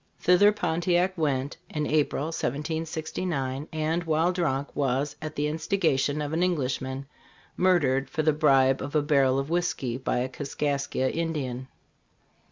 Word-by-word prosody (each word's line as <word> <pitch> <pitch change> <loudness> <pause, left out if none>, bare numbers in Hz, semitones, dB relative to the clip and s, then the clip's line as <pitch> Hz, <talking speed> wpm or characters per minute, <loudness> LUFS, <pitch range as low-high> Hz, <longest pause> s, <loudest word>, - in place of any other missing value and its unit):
Thither 180 +4 +5
Pontiac 180 -1 +1
went, 140 -4 -1
in 150 -1 -2
April, 150 -2 +1
1769, 155 -1 -3
and 160 +2 -1
while 160 +2 +2
drunk, 145 -6 -2
was, 140 +1 0
at 155 0 -6
the 145 - 0
instigation 155 -3 0
of 145 +1 -4
an 165 - 0
Englishman, 135 -6 -1 0.5
murdered, 140 -8 +2
for 155 -2 -1
the 155 0 +3
bribe 135 -3 +4
of 145 +3 -5
a 150 - +3
barrel 135 -3 +3
of 135 +3 -2
whisky, 155 -8 -1
by 130 - -1
a 125 +1 0
Kaskaskia 140 -1 -2
Indian. 140 -6 -3
150 Hz, 140 wpm, -27 LUFS, 135-165 Hz, 0.5 s, Thither